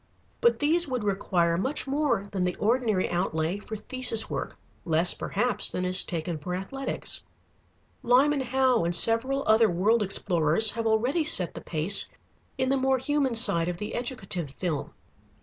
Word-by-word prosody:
But 475 0 +3
these 325 +3 +1
would 250 -4 -3
require 180 -4 0
much 260 +11 -2
more 270 -7 -1
than 190 -2 -2
the 180 -1 -1
ordinary 220 -3 0
outlay 175 +1 -2
for 220 +1 -8
thesis 250 -1 +1
work, - - -5 0.3
less, 165 +1 +3
perhaps, 240 +5 -1
than 180 - -3
is 180 0 +2
taken 170 -2 -5
for 180 +5 -5
Athletics. 270 +9 -4 0.8
Lyman 270 +4 +3
Howe 260 -3 +1
and 170 +1 0
several 235 +8 +2
other 220 +1 +4
world 205 +7 +1
explorers 185 0 +2
have 230 0 -3
already 245 +9 +1
set 185 - +2
the - - -9
pace 170 +5 +2 0.5
in 260 0 -1
the 275 - +1
more 265 0 +1
human 275 -1 -1
side 170 -7 +4
of 175 - -4
the 210 +3 -6
educative 195 - -3
film. 155 +1 -4
220 Hz, 160 wpm, -26 LUFS, 180-260 Hz, 0.8 s, other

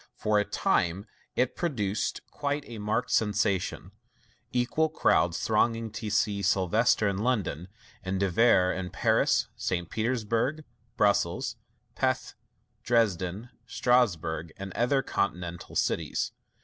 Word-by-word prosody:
For 105 -1 +1
a 105 - +1
time 90 +4 0 0.3
it 125 0 +1
produced 110 - -1
quite 145 0 -2
a 115 -2 -8
marked 110 +4 -1
sensation, 100 -3 0 0.6
equal 125 +6 +1
crowds 85 - +2
thronging 115 0 +1
to 110 - -5
see 100 -1 +1
Sylvester 100 +4 +2
in 100 -1 -1
London, 105 - -1 0.4
and 95 0 -2
De 100 - +2
Vere 90 -3 +4
in 95 -1 -4
Paris, - - +2
St. 85 -2 -2
Petersburg, 115 +5 -1 0.3
Brussels, 100 -4 +1 0.4
Pesth, - - 0 0.5
Dresden, 105 -2 0 0.2
Strasburg, 85 -10 +1
and 95 -1 -7
other 135 +3 +1
continental 90 -7 -3
cities. - - 0
105 Hz, 115 wpm, -28 LUFS, 95-120 Hz, 0.6 s, Vere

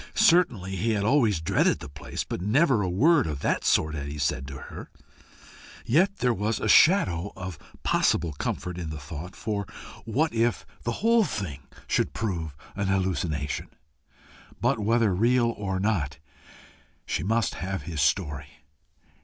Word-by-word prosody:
Certainly 145 - +3
he 110 +5 +1
had 100 -2 0
always 110 - +3
dreaded 80 - +2
the - - -8
place, 70 0 -5
but - - -5
never 125 - +3
a 95 - -1
word 145 - +4
of 75 -3 -4
that - - 0
sort 80 -1 +2
had 70 -2 -4
he 75 +1 -6
said 70 -2 -1
to 70 -1 -7
her. - - -9 1.0
Yet 190 +10 +3
there 125 -6 +2
was 105 +2 -1
a - - -2
shadow 100 - +4
of 95 -4 -7 0.2
possible 80 -3 +2
comfort 90 +5 -4
in 85 -3 -4
the 75 - -5
thought 75 +5 -8
for, 105 -3 -3 0.4
what 135 +7 0
if 115 0 +1 0.2
the 120 - -2
whole 230 0 +5
thing 95 - -4 0.3
should - - 0
prove 85 -9 -3 0.2
an 100 0 -1
hallucination! 90 -7 -1 0.9
But - - +1
whether 110 -1 +2
real 115 +4 +3
or 95 -2 -3
not, 90 -9 0 0.9
she - - -2
must 115 +3 +1
have 95 -3 -3
his 80 -1 -3
story. 70 -2 -1
95 Hz, 155 wpm, -26 LUFS, 80-115 Hz, 1.0 s, whole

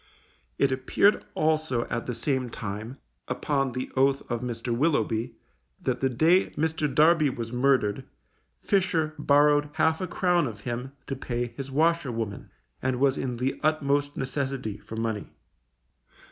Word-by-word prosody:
It 140 - +3
appeared 130 +10 +2
also 155 -6 +1
at 115 - -3
the 125 - -2
same 130 +1 -1
time, 110 +4 -6 0.3
upon 135 -3 -1
the 130 +1 -4
oath 135 +1 +3
of 120 -1 -1
Mr. 120 -1 -3
Willoughby, 125 -5 0 0.4
that 130 -2 -1
the 135 - +1
day 160 +9 +3
Mr. 155 -1 0
Darby 155 +1 +5
was 115 -3 -5
murdered, 125 -5 +2 0.6
Fisher 175 -6 +1
borrowed 145 0 +4
half 160 +2 +2
a 185 - -2
crown 175 -3 +2
of 105 -3 -8
him 125 +3 -4
to 135 - -3
pay 120 -2 -3
his 135 -1 -6
washerwoman, 135 -8 0 0.3
and 130 -1 0
was 135 0 +3
in 125 -2 -3
the 130 +3 -1
utmost 145 -2 +1
necessity 135 -5 -3
for 110 - -9
money. 110 -2 -3
135 Hz, 145 wpm, -27 LUFS, 120-150 Hz, 0.6 s, Darby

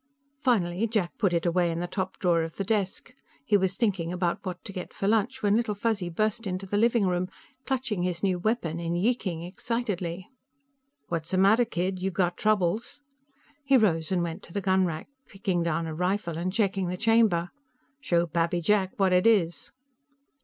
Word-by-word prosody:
Finally, 215 - +1
Jack 210 -6 -1
put 195 -5 +2
it 170 -1 0
away 175 0 +2
in 165 - -2
the 175 - -2
top 185 +1 -4
drawer 175 -3 +2
of 165 0 -5
the 195 - -2
desk. 205 +3 -2 0.3
He 205 - +3
was 190 -1 +2
thinking 190 -8 0
about 175 -1 -1
what 185 -3 -6
to 200 - -7
get 180 -2 -7
for 195 - -2
lunch 225 +5 +1
when 205 0 +4
Little 225 -2 0
Fuzzy 205 -4 -1
burst 215 +5 -1
into 185 +1 -3
the 195 - -3
living 230 0 +3
room, 180 0 0 0.4
clutching 255 -8 -1
his 180 0 -2
new 185 -2 +1
weapon 175 -5 -1
and 170 0 -2
yeeking 190 -6 0
excitedly. 185 -2 -3 0.8
"What's 165 -1 -3
the 185 - 0
matter, 210 +6 +5
kid? 185 -3 -2
You 190 - 0
got 180 -1 0
troubles?" 215 +5 0 0.6
He 275 -1 +5
rose 165 -7 +2
and 180 -2 +1
went 165 -1 -4
to 170 - -14
the 205 - 0
gunrack, 185 -4 +1 0.2
picking 195 -3 -1
down 170 0 0
a 160 - -4
rifle 180 +1 -1
and 175 +3 -2
checking 195 -3 0
the 180 +1 -3
chamber. 220 -6 +3 0.5
"Show 175 -11 +1
Pappy 170 +1 0
Jack 190 +2 +2
what 190 -2 +3
it 180 +4 +4
is." 175 -9 +2
185 Hz, 190 wpm, -27 LUFS, 175-215 Hz, 0.8 s, matter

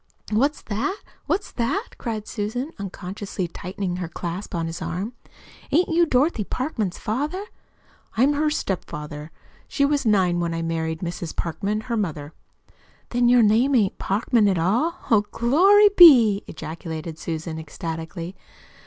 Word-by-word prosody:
"What's 275 +8 +1
that? 260 - -2 0.3
What's 405 - -1
that?" 280 - -1
cried 220 -3 -4
Susan, 245 +7 -3
unconsciously 195 -1 -5
tightening 180 +1 -4
her 180 -2 -3
clasp 175 +3 -5
on 165 -1 -1
his 165 +1 -5
arm. 200 +8 -3 0.6
"Ain't 340 +6 +3
you 340 0 +3
Dorothy 260 -3 +2
Parkman's 220 - -3
father?" 295 - -2 0.7
"I'm 270 +5 +4
her 305 +1 +1
stepfather. 150 - -4 0.4
She 280 - +1
was 290 0 +1
nine 190 -6 +2
when 170 -1 -1
I 165 - -2
married 160 0 -2
Mrs. 170 -2 -5
Parkman, 200 +5 -2
her 235 0 -3
mother." 155 -7 -3 0.8
"Then 240 0 +2
your 245 -1 +6
name 235 +6 +4
ain't 205 -6 +2
Parkman, 215 +2 +2
at 190 -2 +2
all! 230 - +1 0.2
Oh, 215 -2 +6
glory 385 - +5
be!" 235 - +8
ejaculated 160 0 -7
Susan 160 0 -4
ecstatically. 165 +2 -6
205 Hz, 140 wpm, -23 LUFS, 170-255 Hz, 0.8 s, be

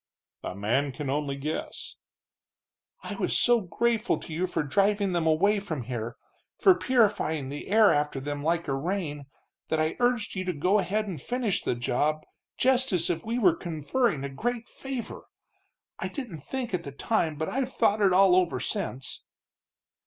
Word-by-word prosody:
"A - - -4
man 120 +8 0
can 135 +1 -4
only 145 -1 -1
guess." 150 +3 -4 1.1
"I - - -5
was - - 0
so 240 -1 +4
grateful 225 +6 0
to 160 - -8
you 180 +4 0
for 175 - -1
driving 200 +5 +2
them 170 -2 +1
away 200 +7 +3
from 160 -10 -4
here, 115 -1 -5 0.4
for 380 - +6
purifying 205 - +1
the 145 +1 -6
air 215 0 +6
after 145 -1 0
them 145 +1 -4
like 170 +1 0
a 140 - 0
rain, 150 -1 -3 0.4
that 160 - 0
I 155 +1 0
urged 245 -3 +1
you 185 - -2
to 180 - -1
go 180 +7 +2
ahead 210 +3 -1
and 170 -8 -5
finish 245 - -1
the - - -1
job, 140 +6 0 0.3
just 260 0 +3
as 175 -2 +2
if 165 -1 -3
we 230 +2 -2
were 190 -8 +5
conferring 165 - -1
a 140 - -3
great 235 - -3
favor! 270 -3 -6 0.7
I - - -2
didn't 235 - -6
think 250 - -4
at 180 - 0
the 140 - -7
time, 160 +1 0
but 155 +2 -3
I've 260 0 -1
thought 210 -3 +2
it 195 -2 +5
all 185 0 +6
over 185 -2 +2
since." 165 -10 -4
175 Hz, 175 wpm, -27 LUFS, 145-215 Hz, 1.1 s, for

